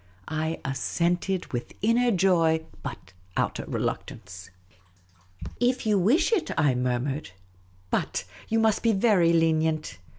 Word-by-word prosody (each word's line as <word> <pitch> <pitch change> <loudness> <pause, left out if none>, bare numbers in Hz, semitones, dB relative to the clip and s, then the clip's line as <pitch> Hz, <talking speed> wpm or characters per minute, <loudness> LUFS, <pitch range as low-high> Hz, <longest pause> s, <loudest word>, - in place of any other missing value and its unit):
I 160 +1 -2
assented, 175 +7 -1
with 120 0 -4
inner 240 +3 +3
joy, 170 -5 +3 0.2
but - - -8 0.2
outer - - -1
reluctance. 90 0 -5 0.5
" 90 0 -34 0.4
If 250 0 +1
you 210 -2 +3
wish 260 - +3
it," 360 -7 +1
I 145 -4 +3
murmured; 125 +3 -2 0.3
" 90 0 -32
but - - -1
— - - -20
you 225 - +1
must 220 -2 +2
be 230 -1 +3
very 195 -5 +4
lenient 160 - +1
165 Hz, 135 wpm, -26 LUFS, 135-215 Hz, 0.5 s, very